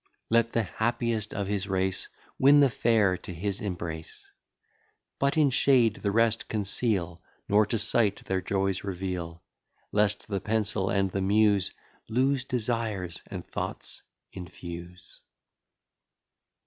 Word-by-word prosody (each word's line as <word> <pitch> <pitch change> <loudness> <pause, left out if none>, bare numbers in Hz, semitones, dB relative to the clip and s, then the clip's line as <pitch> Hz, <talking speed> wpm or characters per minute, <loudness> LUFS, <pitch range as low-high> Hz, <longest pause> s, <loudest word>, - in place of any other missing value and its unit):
Let 115 0 +3
the 115 - +2
happiest 110 0 -1
of 100 - -2
his 100 0 -2
race 95 -1 -1 0.3
Win 140 +2 +7
the 140 -3 +5
fair 110 -6 +2
to 90 - -9
his 95 +3 -3
embrace. 85 -5 -6 0.9
But 140 +2 +1
in 145 -3 +4
shade 125 -4 +3
the 100 - -2
rest 115 +2 +2
conceal, 100 -4 0 0.3
Nor 105 +1 +4
to 115 - 0
sight 105 -1 +2
their 95 -1 -1
joys 95 0 -1
reveal, 90 -3 -5 0.5
Lest 105 -1 +1
the 100 -2 -2
pencil 105 -3 0
and 95 -1 +1
the 95 - -2
Muse 100 -1 +3 0.4
Loose 130 +3 +1
desires 110 -8 -2
and - - -7
thoughts - - -4 0.3
infuse. 85 0 -10
100 Hz, 125 wpm, -28 LUFS, 95-115 Hz, 0.9 s, Win